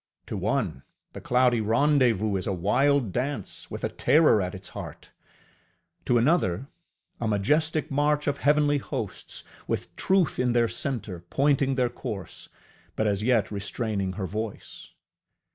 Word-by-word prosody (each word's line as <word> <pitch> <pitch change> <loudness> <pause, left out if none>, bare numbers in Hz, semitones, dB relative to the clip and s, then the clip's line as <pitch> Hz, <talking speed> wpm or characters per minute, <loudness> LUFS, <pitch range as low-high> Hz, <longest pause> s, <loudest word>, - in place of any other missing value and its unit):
To - - -5
one, 65 - -1 0.3
the - - -8
cloudy 125 -2 +3
rendezvous 115 -3 +2
is 95 - -2
a 100 - 0
wild 125 +6 +2
dance, 130 -4 -4
with - - -7
a - - 0
terror 150 -9 +4
at 90 0 -3
its 95 0 -8
heart; - - -9 0.9
to 120 - +3
another, 125 - +2 0.5
a 115 - -1
majestic 150 +9 +1
march 145 +1 +1
of 145 0 -1
heavenly 145 0 +3
hosts, - - -5 0.2
with - - -3
Truth 190 -4 +1
in 125 -1 +2
their 120 -1 +3
centre 115 -9 -3
pointing 140 -1 +2
their 125 -2 +1
course, 100 -5 -7 0.5
but 110 - 0
as 100 -1 +1
yet 115 -2 +2
restraining 100 -1 -2
her 95 0 -3
voice. 110 +2 -6
120 Hz, 145 wpm, -26 LUFS, 105-145 Hz, 0.9 s, terror